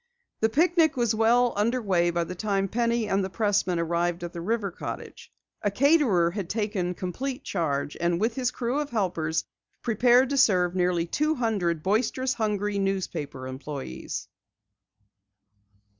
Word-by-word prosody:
The 220 Hz, -, +2 dB
picnic 325 Hz, +2 st, +3 dB
was 235 Hz, -2 st, +2 dB
well 235 Hz, +3 st, +3 dB
under 230 Hz, +5 st, +1 dB
way 180 Hz, -6 st, +2 dB
by 170 Hz, 0 st, 0 dB
the 175 Hz, -, -6 dB
time 195 Hz, +1 st, -1 dB
Penny 235 Hz, +1 st, 0 dB
and 195 Hz, -1 st, +1 dB
the 190 Hz, -, -3 dB
pressman 195 Hz, -3 st, +1 dB
arrived 170 Hz, +1 st, -1 dB
at 175 Hz, -, -5 dB
the 170 Hz, -, -5 dB
river 205 Hz, +1 st, -1 dB
cottage. -, -, -8 dB, 0.3 s
A 205 Hz, -, +1 dB
caterer 235 Hz, -, +3 dB
had 190 Hz, -2 st, -5 dB
taken 205 Hz, -5 st, -1 dB
complete 255 Hz, -, -4 dB
charge, 145 Hz, -5 st, -2 dB
and 170 Hz, 0 st, +1 dB
with 225 Hz, +3 st, +1 dB
his 250 Hz, 0 st, 0 dB
crew 250 Hz, +3 st, -2 dB
of 295 Hz, -1 st, -3 dB
helpers, 170 Hz, -8 st, -1 dB, 0.4 s
prepared 245 Hz, +3 st, +4 dB
to 280 Hz, -, 0 dB
serve 180 Hz, -7 st, +4 dB
nearly 180 Hz, -2 st, +1 dB
two 305 Hz, -, 0 dB
hundred 195 Hz, -, -1 dB
boisterous, 250 Hz, +6 st, +1 dB
hungry 210 Hz, -2 st, -1 dB
newspaper 175 Hz, -9 st, -3 dB
employes. 130 Hz, -, -6 dB
200 Hz, 150 wpm, -26 LUFS, 175-235 Hz, 0.4 s, prepared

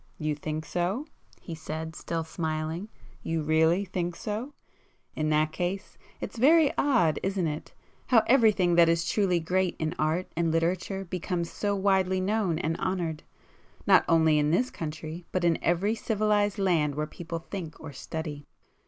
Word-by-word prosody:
"You 155 Hz, -1 st, -1 dB
think 155 Hz, +1 st, -4 dB
so?" 180 Hz, -, -1 dB, 0.3 s
he 170 Hz, -, -8 dB
said 160 Hz, 0 st, -6 dB
still 165 Hz, -1 st, -3 dB
smiling—"you 160 Hz, +1 st, -4 dB
really 160 Hz, +5 st, +3 dB
think 175 Hz, -2 st, -3 dB
so? 225 Hz, +10 st, -5 dB, 0.6 s
In 155 Hz, 0 st, 0 dB
that 155 Hz, 0 st, +2 dB
case 180 Hz, +4 st, -3 dB, 0.2 s
it's -, -, -6 dB
very 300 Hz, +3 st, +5 dB
odd 235 Hz, -, +2 dB
isn't 195 Hz, -2 st, -1 dB
it, 150 Hz, -1 st, -5 dB, 0.3 s
how 230 Hz, -4 st, +5 dB
everything 215 Hz, -8 st, +4 dB
that 170 Hz, -1 st, +7 dB
is 165 Hz, 0 st, +1 dB
truly 190 Hz, -5 st, +2 dB
great 180 Hz, +2 st, 0 dB
in 160 Hz, 0 st, -2 dB
art 160 Hz, +4 st, +1 dB
and 165 Hz, 0 st, +1 dB
literature 180 Hz, +4 st, -1 dB
becomes 175 Hz, -1 st, -3 dB
so 205 Hz, -1 st, -1 dB
widely 190 Hz, -1 st, +2 dB
known 190 Hz, -3 st, 0 dB
and 165 Hz, -1 st, -1 dB
honoured, 175 Hz, -5 st, -2 dB, 0.6 s
not -, -, +6 dB
only 160 Hz, -2 st, +4 dB
in 150 Hz, 0 st, +2 dB
this 245 Hz, +11 st, +1 dB
country 160 Hz, +2 st, -6 dB
but 185 Hz, -, -1 dB
in 170 Hz, -2 st, +2 dB
every 180 Hz, +5 st, +2 dB
civilized 210 Hz, -2 st, +1 dB
land 165 Hz, -7 st, +1 dB
where 150 Hz, +1 st, -1 dB
people 165 Hz, +2 st, -6 dB
think 165 Hz, -1 st, -7 dB
or 160 Hz, -3 st, -9 dB
study? 150 Hz, 0 st, -6 dB
170 Hz, 155 wpm, -28 LUFS, 160-195 Hz, 0.6 s, that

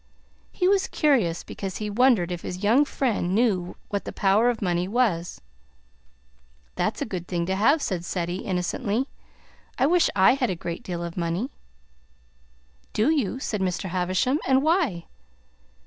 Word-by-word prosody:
He 360 Hz, -, 0 dB
was 390 Hz, 0 st, +3 dB
curious 240 Hz, -, +1 dB
because 195 Hz, -2 st, -6 dB
he 215 Hz, -, -4 dB
wondered 210 Hz, -5 st, +3 dB
if 175 Hz, -1 st, -4 dB
his 180 Hz, +2 st, -6 dB
young 240 Hz, +8 st, +4 dB
friend 215 Hz, -11 st, -1 dB
knew 200 Hz, -6 st, +1 dB
what 200 Hz, -1 st, -2 dB
the -, -, -6 dB
power 205 Hz, +4 st, +3 dB
of 240 Hz, -2 st, -1 dB
money 175 Hz, -2 st, 0 dB
was. 195 Hz, -7 st, 0 dB, 1.3 s
"That's -, -, -1 dB
a -, -, -4 dB
good 175 Hz, -2 st, -5 dB
thing 170 Hz, -2 st, -1 dB
to 190 Hz, +2 st, -1 dB
have," 280 Hz, +10 st, +3 dB
said 180 Hz, -4 st, -2 dB
Ceddie 175 Hz, 0 st, -3 dB
innocently. 205 Hz, +7 st, -1 dB, 0.7 s
"I 260 Hz, -, +3 dB
wish 345 Hz, +3 st, +4 dB
I 190 Hz, +4 st, +6 dB
had 260 Hz, -3 st, 0 dB
a 185 Hz, -, -1 dB
great 170 Hz, 0 st, -5 dB
deal 175 Hz, -2 st, -5 dB
of 170 Hz, 0 st, -6 dB
money." 175 Hz, +9 st, -2 dB, 1.4 s
"Do 225 Hz, +8 st, +2 dB
you?" 265 Hz, -5 st, 0 dB
said 210 Hz, -6 st, -3 dB
Mr. 185 Hz, 0 st, -2 dB
Havisham. 185 Hz, -, 0 dB
"And 265 Hz, +1 st, +4 dB
why?" 310 Hz, -, +1 dB
200 Hz, 160 wpm, -25 LUFS, 180-255 Hz, 1.4 s, I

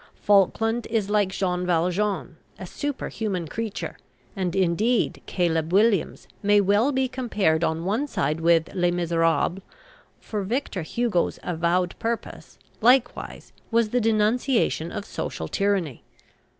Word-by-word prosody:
Falkland 225 Hz, +4 st, +2 dB
is 215 Hz, -3 st, -1 dB
like 205 Hz, -2 st, +2 dB
Jean 180 Hz, -2 st, -1 dB
Valjean, 180 Hz, +2 st, 0 dB, 0.2 s
a 185 Hz, -, -7 dB
superhuman 215 Hz, -, -3 dB
creature; 205 Hz, -2 st, -5 dB, 0.4 s
and, 185 Hz, -2 st, -2 dB
indeed, 195 Hz, +6 st, +1 dB
"Caleb 165 Hz, -3 st, 0 dB
Williams" 200 Hz, -1 st, +2 dB
may 205 Hz, 0 st, +4 dB
well 205 Hz, +7 st, +3 dB
be 265 Hz, -1 st, +1 dB
compared 215 Hz, -11 st, 0 dB
on 165 Hz, +1 st, -1 dB
one 225 Hz, +10 st, 0 dB
side 165 Hz, -, -1 dB
with 165 Hz, -1 st, +3 dB
"Les 175 Hz, -2 st, +2 dB
Misérables," 170 Hz, 0 st, +1 dB, 0.6 s
for 210 Hz, -2 st, -4 dB
Victor 210 Hz, -1 st, -2 dB
Hugo's 210 Hz, +2 st, -1 dB
avowed 175 Hz, +1 st, 0 dB
purpose, 230 Hz, 0 st, -5 dB, 0.2 s
likewise, 245 Hz, +1 st, +1 dB, 0.2 s
was 230 Hz, -1 st, +2 dB
the 245 Hz, +2 st, +1 dB
denunciation 225 Hz, -, +1 dB
of -, -, -5 dB
social 80 Hz, -, -5 dB
tyranny. 190 Hz, -, -1 dB
195 Hz, 125 wpm, -24 LUFS, 170-225 Hz, 0.6 s, may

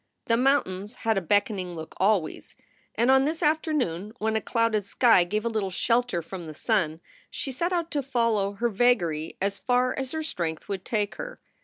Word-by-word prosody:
The 230 Hz, -, +3 dB
mountains 230 Hz, -5 st, +1 dB
had 225 Hz, -1 st, +3 dB
a 195 Hz, -, +1 dB
beckoning 185 Hz, 0 st, 0 dB
look 160 Hz, -1 st, -8 dB
always, 195 Hz, -4 st, 0 dB, 0.4 s
and 240 Hz, +3 st, +3 dB
on 265 Hz, 0 st, +5 dB
this 320 Hz, +3 st, -2 dB
afternoon, 285 Hz, -, 0 dB
when 220 Hz, -1 st, -1 dB
a 220 Hz, -, +1 dB
clouded 230 Hz, -1 st, +1 dB
sky 215 Hz, -1 st, +4 dB
gave 215 Hz, +5 st, -2 dB
a -, -, +2 dB
little 215 Hz, -4 st, -1 dB
shelter 230 Hz, -2 st, +1 dB
from 175 Hz, 0 st, -7 dB
the 155 Hz, -, -8 dB
sun, 170 Hz, -6 st, 0 dB, 0.3 s
she 270 Hz, -, -4 dB
set 340 Hz, +8 st, -1 dB
out 340 Hz, -2 st, -1 dB
to 290 Hz, -, 0 dB
follow 230 Hz, -6 st, +1 dB
her 235 Hz, +4 st, 0 dB
vagary 185 Hz, -9 st, +1 dB
as 200 Hz, +1 st, -1 dB
far 250 Hz, 0 st, +2 dB
as 265 Hz, +1 st, -4 dB
her 315 Hz, 0 st, -2 dB
strength 170 Hz, -, -4 dB
would 195 Hz, -2 st, -4 dB
take 210 Hz, -2 st, -1 dB
her. -, -, -7 dB
220 Hz, 190 wpm, -26 LUFS, 190-255 Hz, 0.4 s, on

